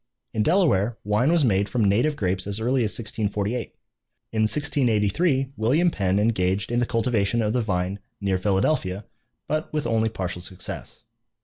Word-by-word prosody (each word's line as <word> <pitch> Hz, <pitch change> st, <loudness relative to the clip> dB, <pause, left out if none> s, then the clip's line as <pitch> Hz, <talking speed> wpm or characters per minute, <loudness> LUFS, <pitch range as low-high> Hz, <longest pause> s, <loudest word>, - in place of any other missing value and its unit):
In 110 Hz, -, 0 dB
Delaware 120 Hz, -, +2 dB
wine 105 Hz, +8 st, +2 dB
was 170 Hz, -4 st, +4 dB
made 100 Hz, -3 st, +2 dB
from 115 Hz, +2 st, 0 dB
native 120 Hz, +10 st, +2 dB
grapes 95 Hz, -4 st, -1 dB
as 100 Hz, +1 st, -3 dB
early 125 Hz, +2 st, +1 dB
as 110 Hz, -, 0 dB
1648. 110 Hz, 0 st, -3 dB, 0.6 s
In 110 Hz, -, 0 dB
1683 135 Hz, -, +1 dB
William 145 Hz, +11 st, +2 dB
Penn 95 Hz, -5 st, 0 dB
engaged 100 Hz, -2 st, +1 dB
in 120 Hz, -, +1 dB
the 120 Hz, -, +1 dB
cultivation 115 Hz, -2 st, +1 dB
of 105 Hz, 0 st, 0 dB
the 125 Hz, -, +1 dB
vine 95 Hz, -2 st, -2 dB, 0.2 s
near 95 Hz, -2 st, 0 dB
Philadelphia, 100 Hz, 0 st, 0 dB, 0.4 s
but 155 Hz, +1 st, -2 dB
with 150 Hz, -3 st, -2 dB
only 115 Hz, -1 st, +1 dB
partial 90 Hz, -4 st, -4 dB
success. 90 Hz, 0 st, -8 dB
110 Hz, 155 wpm, -24 LUFS, 100-125 Hz, 0.6 s, was